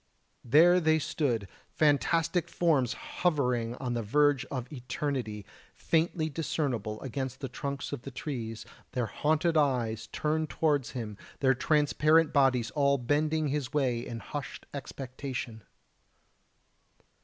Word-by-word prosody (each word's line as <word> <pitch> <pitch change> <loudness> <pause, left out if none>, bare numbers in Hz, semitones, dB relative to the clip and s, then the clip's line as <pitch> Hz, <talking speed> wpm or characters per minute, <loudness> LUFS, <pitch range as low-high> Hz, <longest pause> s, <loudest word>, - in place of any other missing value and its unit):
There 170 +8 +6
they 160 -2 +3
stood, 125 -9 -1 0.2
fantastic 160 +4 +2
forms 145 -8 +2
hovering 125 -9 0
on 125 -2 -3
the 120 - -1
verge 145 +4 +3
of 130 0 -5
Eternity, 125 -5 -3 0.3
faintly 160 -1 +1
discernible 135 -9 -2
against 130 0 -4
the 135 - -4
trunks 140 +2 -4
of 145 - -4
the 135 - -7
trees, 120 -4 -5 0.3
their 125 -2 0
haunted 155 +7 +1
eyes 115 -6 +1
turned 155 +6 -1
towards 145 -5 0
him, 105 -4 -5 0.2
their 130 -1 +4
transparent 155 +3 +3
bodies 130 -4 +3
all 140 -2 +3
bending 150 +4 +1
his 135 -3 -2
way 130 -5 +1
in 115 -2 -6
hushed 145 -2 -6
expectation. 130 -4 -6
140 Hz, 120 wpm, -30 LUFS, 120-155 Hz, 0.3 s, There